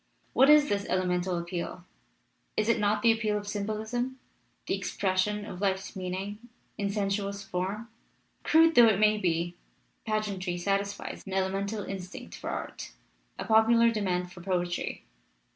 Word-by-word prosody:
What 265 Hz, +2 st, +6 dB
is 300 Hz, -1 st, +7 dB
this 200 Hz, 0 st, -1 dB
elemental 180 Hz, -1 st, 0 dB
appeal? 170 Hz, +1 st, -4 dB, 0.7 s
Is 215 Hz, +1 st, +1 dB
it 230 Hz, -, +3 dB
not 210 Hz, 0 st, +1 dB
the 230 Hz, -, +7 dB
appeal 220 Hz, -2 st, 0 dB
of 205 Hz, 0 st, -6 dB
symbolism, 220 Hz, +5 st, -2 dB, 0.5 s
the -, -, -1 dB
expression 205 Hz, +2 st, -1 dB
of 185 Hz, -3 st, -8 dB
life's 190 Hz, 0 st, -1 dB
meanings 190 Hz, +2 st, -4 dB, 0.4 s
in 200 Hz, -1 st, -1 dB
sensuous 200 Hz, 0 st, -1 dB
form? 195 Hz, +5 st, -3 dB, 0.5 s
Crude 325 Hz, +1 st, +5 dB
though 240 Hz, -4 st, +8 dB
it 210 Hz, -3 st, +3 dB
may 215 Hz, 0 st, +4 dB
be, 175 Hz, -2 st, 0 dB, 0.5 s
pageantry 200 Hz, -5 st, -1 dB
satisfies 200 Hz, +3 st, -2 dB
an 190 Hz, -, -5 dB
elemental 195 Hz, +2 st, -1 dB
in 195 Hz, -, -4 dB
stinct 180 Hz, 0 st, -9 dB
for -, -, -6 dB
art, -, -, -5 dB, 0.4 s
a -, -, -4 dB
popular 230 Hz, +1 st, +5 dB
demand 180 Hz, -5 st, -1 dB
for 175 Hz, -1 st, -11 dB
poetry. 175 Hz, -1 st, -2 dB
200 Hz, 145 wpm, -29 LUFS, 185-215 Hz, 0.7 s, though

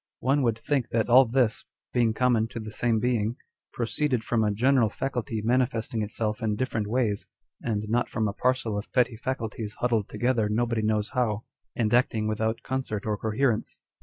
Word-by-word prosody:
One 135 Hz, +3 st, +2 dB
would 115 Hz, -4 st, +1 dB
think 135 Hz, +1 st, -1 dB
that 115 Hz, +1 st, 0 dB
all 130 Hz, +2 st, +8 dB
this, 120 Hz, -2 st, +1 dB, 0.3 s
being 115 Hz, -3 st, +2 dB
common 120 Hz, -3 st, +2 dB
to 115 Hz, -, -7 dB
the 110 Hz, -1 st, -7 dB
same 115 Hz, 0 st, +1 dB
being, 115 Hz, -1 st, 0 dB, 0.4 s
proceeded 125 Hz, 0 st, -1 dB
from 115 Hz, -1 st, +1 dB
a 105 Hz, -, +2 dB
general 120 Hz, +2 st, +3 dB
faculty 120 Hz, -2 st, -3 dB
manifesting 120 Hz, -2 st, 0 dB
itself 105 Hz, 0 st, -2 dB
in 110 Hz, -2 st, 0 dB
different 110 Hz, -2 st, -2 dB
ways, 110 Hz, -3 st, 0 dB, 0.3 s
and 105 Hz, -2 st, -2 dB
not 120 Hz, +3 st, +1 dB
from 110 Hz, -1 st, 0 dB
a 100 Hz, -, -2 dB
parcel 125 Hz, -3 st, 0 dB
of 105 Hz, -, -9 dB
petty 125 Hz, -3 st, +3 dB
faculties 110 Hz, -3 st, -4 dB
huddled 115 Hz, -4 st, 0 dB
together 120 Hz, -3 st, +1 dB
nobody 115 Hz, +1 st, 0 dB
knows 105 Hz, -1 st, 0 dB
how, 115 Hz, -4 st, 0 dB, 0.3 s
and 110 Hz, -2 st, 0 dB
acting 115 Hz, -3 st, +2 dB
without 110 Hz, +1 st, -1 dB
concert 130 Hz, -6 st, -3 dB
or 105 Hz, -1 st, 0 dB
coherence. 110 Hz, +3 st, 0 dB
115 Hz, 175 wpm, -27 LUFS, 110-125 Hz, 0.4 s, all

